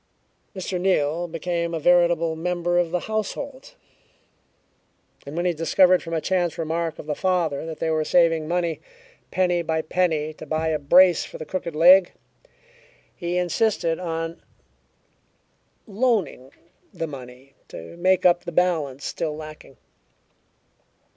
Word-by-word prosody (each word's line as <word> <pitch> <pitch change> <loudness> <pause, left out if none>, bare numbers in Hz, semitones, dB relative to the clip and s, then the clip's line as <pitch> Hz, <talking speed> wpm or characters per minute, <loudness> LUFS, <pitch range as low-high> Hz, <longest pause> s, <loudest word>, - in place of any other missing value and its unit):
Mr. 185 -1 -4
Neal 175 -2 +1
became 170 0 -3
a - - -2
veritable 170 -1 +3
member 175 +1 0
of 175 -2 0
the 180 +1 -2
household, 220 +6 -5 1.5
and 145 - -7
when 175 - -1
he 180 - +2
discovered 180 +3 +3
from 165 0 -5
a - - +1
chance 175 0 -1
remark 165 0 -2
of - - -9
the 150 - -2
father 165 -4 -1
that 160 -1 -6
they 160 - -1
were 155 -1 +1
saving 165 -1 +2
money, 170 -2 -1 0.5
penny 180 -1 +1
by 160 -1 -1
penny, 155 -3 0
to 155 - -11
buy 160 +2 -1
a 155 -1 0
brace 175 +5 +5
for - - -9
the 155 - -7
crooked 170 0 -5
leg, 180 +3 +6 1.0
he 175 0 -3
insisted 180 -1 0
on 165 -1 -4 1.4
"loaning" 210 - -1 0.4
the 170 -4 -4
money 130 -2 -11
to 85 - -10
make 185 +1 +2
up 175 -1 +4
the - - -6
balance 155 -6 0
still 155 -2 -3
lacking. 155 -3 -11
170 Hz, 140 wpm, -23 LUFS, 155-180 Hz, 1.5 s, leg